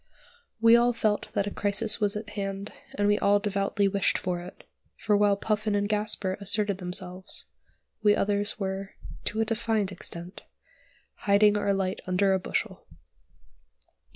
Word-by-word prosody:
We 230 +1 +7
all 240 +1 +4
felt 215 -2 -1
that 200 -1 0
a 205 - -4
crisis 205 +3 0
was 205 -1 +2
at 210 0 -5
hand, 200 -1 -4 0.2
and 205 0 +1
we 205 0 +3
all 205 0 +4
devoutly 200 0 0
wished 195 0 +1
it; 175 0 -4 0.3
for 210 - +1
while 205 -1 +3
Puffin 215 0 -1
and 205 0 +1
Gasper 210 -2 0
asserted 200 -1 +1
themselves, 180 0 -2 0.6
we 210 -1 +5
others 205 +2 +1
were, 195 0 -4 0.3
to 220 - -1
a - - +2
defined 220 -3 0
extent, 175 0 -6 0.9
hiding 205 +1 +5
our 205 -1 +1
light 195 -1 -1
under 190 +1 +2
a 190 - +2
bushel. 190 +1 -3
205 Hz, 150 wpm, -27 LUFS, 195-210 Hz, 0.9 s, We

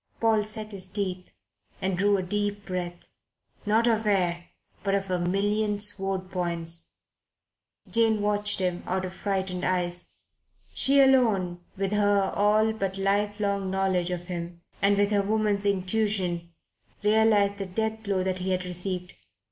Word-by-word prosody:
Paul 225 -2 +3
set 215 0 -7
his 190 -2 -4
teeth 185 -2 -3 0.5
and 190 -1 0
drew 200 +2 +3
a 190 - -2
deep 205 +2 -2
breath 175 -2 -4 0.6
not 220 +2 +3
of 225 -2 +2
air, 175 -4 +1 0.4
but 195 -1 +1
of 195 -1 -2
a 180 - +1
million 205 +3 0
sword 195 -2 -2
points, 170 -2 -4 0.9
Jane 225 -2 +2
watched 205 0 +1
him 180 -2 -1
out 185 +1 -1
of 185 - -6
frightened 190 -2 -2
eyes. 180 -1 -1 0.6
She 280 +1 +5
alone, 220 -10 +4 0.2
with 195 0 -1
her 205 -2 +2
all 215 +2 +3
but 195 -3 -2
life 205 +2 +1
long 200 -2 0
knowledge 190 -2 +1
of 180 -1 -2
him, 175 -1 -6 0.2
and 200 0 +4
with 205 +1 +2
her 205 -1 +3
woman's 205 0 0
intuition, 185 -3 0 0.5
realized 210 -1 +3
the 195 - -3
death 220 +3 -2
blow 200 -3 0
that 185 0 -1
he 185 +1 -2
had 185 -1 0
received. 180 0 -5
195 Hz, 150 wpm, -27 LUFS, 185-210 Hz, 0.9 s, She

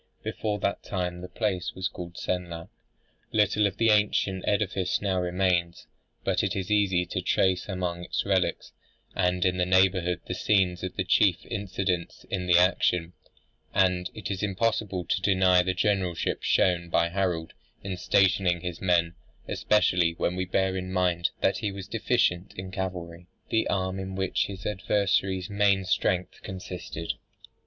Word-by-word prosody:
Before 105 -1 -2
that 100 0 -1
time 90 -2 -3
the 90 - -8
place 95 -2 -2
was 95 0 -1
called 85 0 -8
Senlac. 85 -2 -4 0.6
Little 105 0 +3
of 95 - -6
the 115 -1 +4
ancient 105 -3 +2
edifice 100 -3 0
now 95 -2 0
remains: 90 -1 0 0.4
but - - +1
it - - -1
is 95 +1 -3
easy 95 -4 +3
to 90 +1 -3
trace 95 +1 +1
among 90 -2 -3
its - - -2
relics 95 -2 0 0.4
and 90 -1 +1
in 90 0 +2
the 90 - +2
neighbourhood 95 -2 +3
the - - -4
scenes 95 -4 +1
of 95 - -4
the 95 - 0
chief 90 0 +3
incidents 95 -4 -3
in 90 -2 -2
the 90 -1 +6
action; 90 -1 +2 0.6
and 90 -2 +2
it 100 -4 -5
is 95 - -3
impossible 100 -2 -1
to 95 - 0
deny 95 -1 +4
the 95 +1 -1
generalship 95 -3 0
shown 85 -1 +2
by 85 0 +2
Harold 85 -3 -1 0.3
in 95 -1 -3
stationing 90 -1 +2
his 90 -1 -5
men; 85 -3 +2 0.3
especially 90 -5 +2
when 90 - -1
we 95 0 -1
bear 95 +1 0
in 95 0 -4
mind 90 -2 +1
that - - +2
he 105 -4 -2
was 95 -1 -8
deficient 100 -5 0
in 95 0 -6
cavalry, 90 -2 -5 0.2
the 110 - +1
arm 95 -1 -1
in 95 0 -5
which 95 -1 0
his 95 -2 -8
adversary's 95 -2 0
main 100 -2 +2
strength 90 0 0
consisted. 90 -3 -5
95 Hz, 160 wpm, -27 LUFS, 90-95 Hz, 0.6 s, the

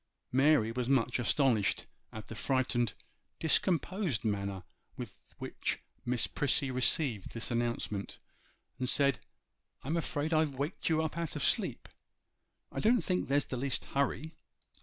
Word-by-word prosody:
Mary 130 -4 +4
was 125 +1 -2
much 125 -2 +2
astonished 120 -4 +2 0.3
at 110 -1 -8
the - - -8
frightened, 125 -1 0 0.4
discomposed 170 - +1
manner 100 -3 -1 0.3
with - - -10
which - - -3 0.3
Miss 120 -1 +1
Prissy 140 -1 +1
received 125 - +1
this 115 +1 -2
announcement, 120 -4 -2 0.6
and 125 -1 0
said, 140 -4 +3 0.6
'I'm 155 +6 -1
afraid 160 -1 -1
I've 155 -3 +2
waked 145 +7 -2
you 160 0 +3
up 160 +1 -3
out 165 -5 -3
of - - -1
sleep. - - +1 0.8
I - - -4
don't 235 +2 +4
think 180 -1 0
there's 140 +1 +2
the 130 - -4
least 135 +1 0
hurry. 140 +3 0
135 Hz, 140 wpm, -32 LUFS, 120-155 Hz, 0.8 s, Mary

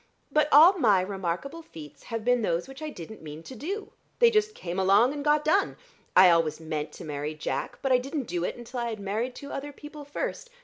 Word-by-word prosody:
But 300 +1 +3
all 340 +7 +8
my 210 - +5
remarkable 190 - -3
feats 150 - -12
have 230 -1 -5
been 245 0 +3
those 175 -4 -1
which 270 +2 -11
I 310 - -4
didn't 215 - -10
mean 155 0 -9
to 260 - -10
do. 390 - -5 0.3
They 470 -1 +6
just 430 0 +1
came 180 +1 -4
along 200 +8 +4
and 290 -1 -5
got 300 0 +2
done. 390 +6 +2 0.4
I 185 -1 +8
always 165 -2 +2
meant 155 -2 -4
to - - -9
marry 150 0 -4
Jack, 155 - -4
but 270 - +1
I 250 - +5
didn't 275 +3 -3
do 175 -6 -3
it - - -2
until 240 +1 -7
I 235 0 -1
had 220 -2 -5
married 215 +6 -3
two 280 - -9
other 290 +1 -5
people 295 +1 -10
first. 290 - -5
240 Hz, 225 wpm, -27 LUFS, 175-295 Hz, 0.4 s, all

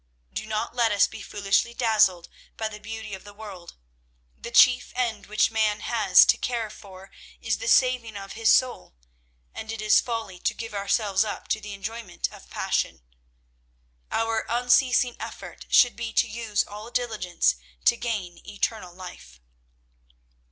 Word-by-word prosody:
Do - - -4
not 215 0 -2
let 235 -2 +2
us 200 -2 +5
be - - -9
foolishly 205 +3 0
dazzled 210 -7 +3 0.3
by 220 - -1
the 210 -1 -10
beauty 220 0 -7
of 190 - -7
the 205 0 -13
world. 200 -5 -10 0.6
The - - -8
chief 245 +1 +5
end 230 -5 -2
which 215 +2 +2
man 215 -2 +1
has 210 -6 +5
to - - +4
care 230 -3 -2
for 195 -2 -13 0.3
is - - -1
the - - -5
saving 250 - +3
of 195 0 -8
his 225 0 +1
soul, 255 - +2 0.6
and 220 0 -6
it 225 - -6
is 215 0 +4
folly 225 -6 -5
to - - -1
give 225 -2 -7
ourselves 200 0 +1
up 215 - -6
to 220 - 0
the 210 -1 -7
enjoyment 210 0 -5
of - - -14
passion. - - -2 1.1
Our 225 0 0
unceasing 245 +1 +3
effort - - -9
should 245 -4 +5
be 225 0 -5
to - - +3
use 220 -2 -1
all 210 +2 -9
diligence 215 - 0 0.3
to - - +6
gain 205 -8 -4
eternal 200 -3 -3
life." 175 - -11
215 Hz, 160 wpm, -25 LUFS, 200-230 Hz, 1.1 s, to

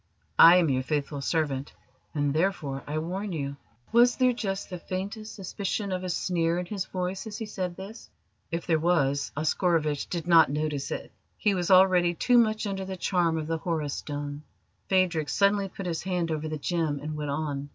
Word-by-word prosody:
I 170 +2 +10
am 170 -4 +3
your 130 0 +1
faithful 145 +1 -2
servant, 145 -2 -1 0.4
and 145 -1 +1
therefore 155 -5 -1
I 150 +1 -2
warn 185 +6 -3
you." 140 -3 -4 0.3
Was 240 +2 +5
there 255 -1 +3
just 195 -5 -4
the 180 - -5
faintest 200 +5 -5
suspicion 200 +1 -3
of 185 0 -2
a 185 - -3
sneer 170 -1 0
in 180 - -2
his 190 0 -3
voice 185 +2 -4
as 210 - -6
he 225 - -4
said 185 -4 -4
this? 200 +4 -9 0.4
If 170 -1 -3
there 160 -2 +2
was, 140 -4 +1
Oscarovitch 155 -2 +1
did 170 -2 -4
not 165 -4 +7
notice 150 -1 -2
it. - - -5 0.3
He 210 -3 +2
was 180 -2 -1
already 185 -2 +5
too 245 +8 +4
much 215 -1 +2
under 195 -1 -3
the 190 0 -5
charm 175 -3 +1
of 155 - -3
the 165 +1 -2
Horus 160 -5 -2
Stone. 145 0 -5 0.5
Phadrig 180 -5 +2
suddenly 200 0 +2
put 195 - -7
his 170 -2 -2
hand 180 -3 -1
over 155 0 -2
the 155 0 -3
gem 155 -2 -1
and 150 +2 -5
went 150 -1 -4
on. 145 -1 -3
170 Hz, 195 wpm, -27 LUFS, 150-190 Hz, 0.5 s, I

